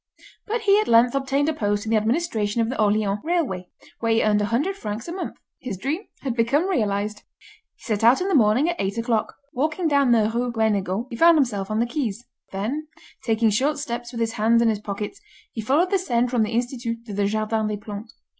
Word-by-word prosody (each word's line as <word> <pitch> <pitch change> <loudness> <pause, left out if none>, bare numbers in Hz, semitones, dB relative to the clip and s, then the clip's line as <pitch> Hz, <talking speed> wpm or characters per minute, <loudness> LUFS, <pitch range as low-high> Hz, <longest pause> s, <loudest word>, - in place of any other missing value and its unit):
But 450 +2 -1
he 410 -1 +4
at 430 - 0
length 235 +1 +5
obtained 275 +1 0
a 315 - +1
post 205 -6 -1
in 220 - -3
the - - +4
administration 225 -2 0
of 225 0 +1
the 260 -3 -2
Orleans 210 -1 +1
Railway, 290 - -1 0.3
where 230 -1 0
he 225 - +3
earned 210 -1 +3
100 240 - 0
francs 215 - -5
a - - -5
month. 365 +1 -5 0.2
His 240 -8 -5
dream 285 - -2 0.2
had 260 -4 -3
become 275 +9 +2
realised. 210 - -1 0.6
He - - -23
set 215 -2 -2
out 240 +3 +6
in 370 - -1
the 390 - 0
morning 245 +2 +4
at 345 0 -1
eight 195 +3 -2
o'clock. 230 -1 -1 0.2
Walking 310 +5 0
down 280 -4 +3
the 220 -3 +4
Rue 245 +1 -1
Guénégaud, 215 -2 0
he - - -4
found 335 +5 +6
himself 210 -9 0
on 215 +1 -1
the 235 - +2
quays. 240 -4 -3 0.3
Then, 245 +11 -3 0.4
taking 225 -1 +2
short 280 +8 +1
steps 240 -4 -5
with 235 -2 -5
his 225 0 0
hands 225 +2 +3
in 230 - +3
his 215 -2 0
pockets, 210 - -6 0.3
he 225 - -5
followed 295 - +2
the 390 - +3
Seine 245 -9 +1
from 245 -2 0
the 215 - +1
Institut 235 -1 -3
to 210 - -7
the 200 0 +1
Jardin 215 +1 -1
des 210 -1 -2
Plantes. 210 +1 -8
230 Hz, 220 wpm, -23 LUFS, 215-280 Hz, 0.6 s, out